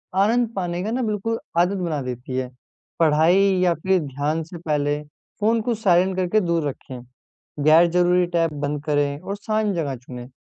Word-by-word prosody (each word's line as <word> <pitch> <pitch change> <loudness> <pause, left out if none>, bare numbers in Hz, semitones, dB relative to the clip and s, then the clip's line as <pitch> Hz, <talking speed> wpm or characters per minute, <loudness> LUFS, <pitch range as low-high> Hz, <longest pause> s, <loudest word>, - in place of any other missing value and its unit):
आनंद 225 +4 +2
पाने 175 -2 -2
का 215 - -3
ना 250 +2 -1
बिल्कुल 220 +1 -2 0.2
आदत 180 +3 +2
बना 165 -6 -2
देती 125 0 -5
है। 130 -1 -2 0.5
पढ़ाई 160 +3 +4 0.2
या 175 -2 +3
फ़िर 190 +3 +1
ध्यान 145 +3 -2
से 170 +2 -10
पहले 150 -3 -1 0.4
फ़ोन 225 +2 +2
को 235 +1 -1
साइलेंट 190 -3 +2
करके 185 +3 +2
दूर 170 -4 0
रखें, 130 -2 -9 0.6
गैर 160 +3 +6
ज़रूरी 180 +1 +3
टैब 165 -1 +1
बंद 145 0 -2
करें 145 -1 0
और 200 - -5
शांत 215 0 -1
जगह 145 -5 -2
चुनें। 125 0 -10
170 Hz, 175 wpm, -22 LUFS, 145-195 Hz, 0.6 s, गैर